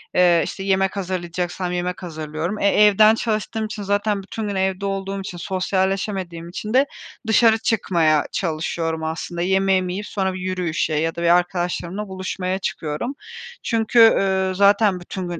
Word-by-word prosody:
Eee, 175 Hz, -2 st, +5 dB
işte, 195 Hz, -, -6 dB
yemek 190 Hz, 0 st, +1 dB
hazırlayacaksam 180 Hz, -1 st, -3 dB
yemek 180 Hz, +1 st, -3 dB
hazırlıyorum. 160 Hz, +4 st, -4 dB
E, 200 Hz, -, +2 dB
evden 210 Hz, +2 st, +6 dB
çalıştığım 220 Hz, -1 st, -2 dB
için 215 Hz, -1 st, -6 dB
zaten 205 Hz, 0 st, 0 dB
bütün 215 Hz, +2 st, -5 dB
gün 200 Hz, -, -3 dB
evde 190 Hz, +1 st, -1 dB
olduğum 195 Hz, 0 st, -3 dB
için, 180 Hz, -2 st, -7 dB
sosyalleşemediğim 190 Hz, -2 st, -2 dB
için 210 Hz, +5 st, -5 dB
de 265 Hz, +2 st, +5 dB, 0.4 s
dışarı 225 Hz, 0 st, +5 dB
çıkmaya 170 Hz, -, +1 dB
çalışıyorum 160 Hz, -1 st, -2 dB
aslında. 165 Hz, +2 st, -4 dB
Yemeğimi 190 Hz, 0 st, +1 dB
yiyip 205 Hz, +3 st, -5 dB
sonra 190 Hz, -2 st, -1 dB
bir 185 Hz, -, -6 dB
yürüyüşe 180 Hz, -4 st, -1 dB
ya 160 Hz, +2 st, 0 dB
da 170 Hz, -, -5 dB
bir 170 Hz, -, +3 dB
arkadaşlarımla 180 Hz, +2 st, -2 dB
buluşmaya 185 Hz, 0 st, -3 dB
çıkıyorum. 165 Hz, -, -4 dB, 0.5 s
Çünkü, 230 Hz, 0 st, +1 dB
ııı, 190 Hz, -4 st, +4 dB
zaten 200 Hz, 0 st, +4 dB
bütün 180 Hz, +1 st, -6 dB
gün 170 Hz, -2 st, -5 dB
190 Hz, 150 wpm, -21 LUFS, 175-200 Hz, 0.5 s, evden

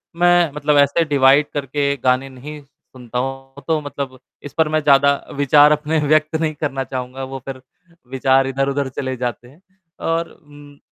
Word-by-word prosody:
मैं 175 Hz, -2 st, +3 dB
मतलब 150 Hz, 0 st, +1 dB
ऐसे 145 Hz, +4 st, +3 dB
डिवाइड 140 Hz, 0 st, +4 dB
करके 140 Hz, 0 st, -1 dB
गाने 130 Hz, +1 st, +1 dB
नहीं 145 Hz, +4 st, -10 dB
सुनता 125 Hz, -3 st, -11 dB
हूँ, 135 Hz, +1 st, -6 dB
तो 160 Hz, -2 st, +1 dB
मतलब 140 Hz, -2 st, -6 dB, 0.2 s
इस 145 Hz, -, -9 dB
पर 160 Hz, -1 st, +3 dB
मैं 155 Hz, 0 st, +1 dB
ज़्यादा 140 Hz, 0 st, +5 dB, 0.2 s
विचार 145 Hz, +1 st, +5 dB
अपने 150 Hz, +1 st, 0 dB
व्यक्त 155 Hz, +1 st, +2 dB
नहीं 155 Hz, -1 st, 0 dB
करना 140 Hz, -3 st, -3 dB
चाहूँगा। 130 Hz, 0 st, -6 dB
वो 135 Hz, 0 st, -6 dB
फ़िर 135 Hz, -1 st, -7 dB, 0.5 s
विचार 135 Hz, 0 st, +2 dB
इधर-उधर 135 Hz, +1 st, -1 dB
चले 130 Hz, 0 st, -4 dB
जाते 120 Hz, 0 st, -4 dB
हैं 145 Hz, +8 st, -20 dB, 0.5 s
और 165 Hz, +1 st, -1 dB
उम, 145 Hz, -1 st, -17 dB
140 Hz, 165 wpm, -19 LUFS, 135-150 Hz, 0.5 s, ज़्यादा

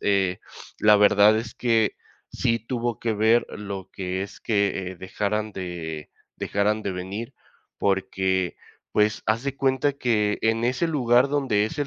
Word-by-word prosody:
eh, 95 Hz, -2 st, +1 dB, 0.4 s
la 105 Hz, 0 st, +6 dB
verdad 105 Hz, +1 st, +5 dB
es 115 Hz, 0 st, -6 dB
que 115 Hz, -4 st, +2 dB, 0.4 s
sí 115 Hz, -1 st, +1 dB
tuvo 120 Hz, 0 st, -3 dB
que 115 Hz, -1 st, -1 dB
ver 110 Hz, +3 st, +3 dB
lo 100 Hz, -2 st, -6 dB
que 95 Hz, 0 st, -3 dB
es -, -, -12 dB
que, 100 Hz, -3 st, 0 dB
eh, 95 Hz, -, -9 dB
dejaran 105 Hz, +3 st, -2 dB
de 85 Hz, -5 st, -6 dB, 0.2 s
dejaran 105 Hz, +2 st, 0 dB
de 100 Hz, -, -2 dB
venir, 95 Hz, +5 st, -5 dB, 0.4 s
porque, 95 Hz, -2 st, 0 dB, 0.3 s
pues, 105 Hz, 0 st, +1 dB
haz 115 Hz, +3 st, +1 dB
de 140 Hz, -1 st, -2 dB
cuenta 135 Hz, +1 st, +1 dB
que 110 Hz, -6 st, 0 dB
en 115 Hz, +1 st, +1 dB
ese 130 Hz, +7 st, +1 dB
lugar 125 Hz, -3 st, +3 dB
donde 130 Hz, -8 st, +1 dB
es 110 Hz, -, -8 dB
el 145 Hz, -, 0 dB
105 Hz, 155 wpm, -24 LUFS, 95-115 Hz, 0.4 s, la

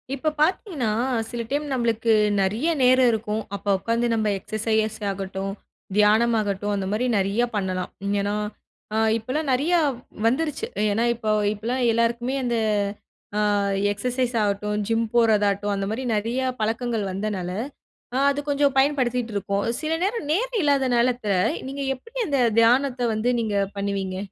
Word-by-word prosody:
இப்ப 310 Hz, +3 st, -1 dB
பாத்தீங்கன்னா, 310 Hz, -, +1 dB, 0.4 s
சில 240 Hz, -1 st, -4 dB
டைம் 290 Hz, +2 st, -1 dB
நம்ப்ளுக்கு 230 Hz, -2 st, +1 dB, 0.3 s
நெறையா 220 Hz, -, +1 dB
நேரம் 255 Hz, 0 st, +5 dB
இருக்கும். 215 Hz, 0 st, -2 dB
அப்போ 200 Hz, 0 st, -5 dB
உக்காந்து 230 Hz, +4 st, 0 dB
நம்ம 220 Hz, -1 st, +1 dB
எக்ஸ்ஸசைஸ் 220 Hz, +1 st, -1 dB
ஆகட்டும், 195 Hz, 0 st, -4 dB, 0.5 s
தியானம் 220 Hz, +3 st, +4 dB
ஆகட்டும், 205 Hz, 0 st, -1 dB
அந்த 195 Hz, -1 st, -2 dB
மாரி 230 Hz, +4 st, 0 dB
நெறையா 200 Hz, +5 st, +1 dB
பண்ணலாம். 185 Hz, -2 st, -2 dB, 0.3 s
ஏனா 205 Hz, +1 st, -1 dB, 0.8 s
இப்பலாம் 270 Hz, +7 st, -3 dB
நெறையா 325 Hz, +7 st, +2 dB, 0.5 s
வந்துருச்சு. 300 Hz, -, 0 dB, 0.2 s
ஏனா 220 Hz, +3 st, +1 dB
இப்போ 220 Hz, -2 st, -2 dB, 0.2 s
இப்பலாம் 235 Hz, +5 st, -3 dB
எல்லாருக்குமே 235 Hz, +3 st, 0 dB
அந்த, 240 Hz, -1 st, 0 dB, 0.8 s
அ -, -, +2 dB, 0.5 s
எக்ஸ்ஸசைஸ் 250 Hz, +3 st, -1 dB
ஆகட்டும், 210 Hz, +1 st, -1 dB
ஜிம் 230 Hz, 0 st, +1 dB
போறதாட்டும் 205 Hz, -3 st, +3 dB
அந்த 195 Hz, 0 st, -2 dB
மாரி 240 Hz, +4 st, -3 dB
நெறையா 235 Hz, +5 st, -1 dB, 0.2 s
பழக்கங்கள் 225 Hz, 0 st, -1 dB
வந்தனால, 190 Hz, -2 st, -3 dB, 0.8 s
அது 280 Hz, +1 st, -1 dB
கொஞ்சம் 285 Hz, -1 st, +2 dB
பயன்படுத்திட்ருக்கோம். 240 Hz, -8 st, 0 dB
சில 310 Hz, +1 st, -2 dB
நேரம், 415 Hz, -4 st, -2 dB
நேரம் 465 Hz, +5 st, 0 dB
இல்லாத 280 Hz, -3 st, +2 dB
நாலத்த 240 Hz, -2 st, +1 dB, 0.4 s
நீங்க 275 Hz, +1 st, -5 dB
எப்டி 460 Hz, -, -11 dB
அந்த 280 Hz, -3 st, +1 dB, 0.2 s
தியானத்த 250 Hz, +2 st, +3 dB
வந்து 220 Hz, +3 st, +1 dB
நீங்கப் 200 Hz, -3 st, -1 dB
பண்ணுவீங்க? 195 Hz, -2 st, -2 dB
230 Hz, 130 wpm, -24 LUFS, 205-260 Hz, 0.8 s, நேரம்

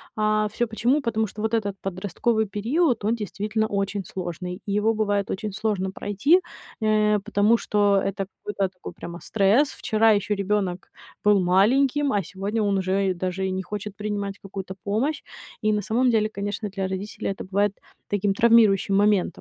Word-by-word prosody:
А 215 Hz, 0 st, +2 dB
всё 240 Hz, -, 0 dB
почему? 240 Hz, +6 st, +1 dB
Потому 220 Hz, -3 st, 0 dB
что 210 Hz, -, -8 dB
вот 220 Hz, +1 st, -1 dB
этот 205 Hz, -3 st, 0 dB
подростковый 205 Hz, +4 st, -1 dB
период, 230 Hz, -, 0 dB
он 225 Hz, -, +2 dB
действительно 215 Hz, 0 st, -2 dB
очень 200 Hz, -1 st, -2 dB
сложный, 180 Hz, +1 st, -5 dB
и 200 Hz, -, -4 dB
его 215 Hz, +2 st, +2 dB
бывает 205 Hz, -2 st, 0 dB
очень 205 Hz, +1 st, -3 dB
сложно 200 Hz, -3 st, -1 dB
пройти, 260 Hz, -, +2 dB, 0.4 s
э, 215 Hz, -1 st, +3 dB
потому 210 Hz, +4 st, +3 dB
что 205 Hz, -3 st, +2 dB
это 195 Hz, 0 st, -2 dB, 0.2 s
какой-то 195 Hz, -2 st, -1 dB
такой 180 Hz, -1 st, -10 dB
прямо 170 Hz, +1 st, -8 dB
стресс. 220 Hz, +8 st, +3 dB
Вчера 220 Hz, +1 st, +2 dB
ещё 210 Hz, 0 st, +1 dB
ребёнок 195 Hz, -2 st, -1 dB, 0.3 s
был 205 Hz, -1 st, +5 dB
маленьким, 260 Hz, +10 st, +3 dB
а 200 Hz, -2 st, +1 dB
сегодня 200 Hz, +5 st, -3 dB
он 200 Hz, -1 st, +1 dB
уже 190 Hz, +1 st, +1 dB
и -, -, 0 dB
даже 185 Hz, +1 st, -3 dB
и 190 Hz, -, -1 dB
не 190 Hz, 0 st, -2 dB
хочет 205 Hz, +1 st, -6 dB
принимать 205 Hz, -1 st, -4 dB
какую-то 190 Hz, -1 st, -7 dB
помощь. 245 Hz, +9 st, -1 dB, 0.4 s
И 215 Hz, 0 st, +2 dB
на 210 Hz, -1 st, 0 dB
самом 250 Hz, +3 st, +2 dB
деле, 215 Hz, -2 st, +2 dB
конечно, 205 Hz, +1 st, -4 dB
для 195 Hz, -1 st, -3 dB
родителей 190 Hz, +2 st, -4 dB
это 195 Hz, -, -4 dB
бывает 200 Hz, +1 st, 0 dB, 0.3 s
таким 205 Hz, -1 st, +1 dB
травмирующим 215 Hz, -3 st, +4 dB
моментом. 205 Hz, -2 st, +4 dB
205 Hz, 175 wpm, -24 LUFS, 195-220 Hz, 0.4 s, был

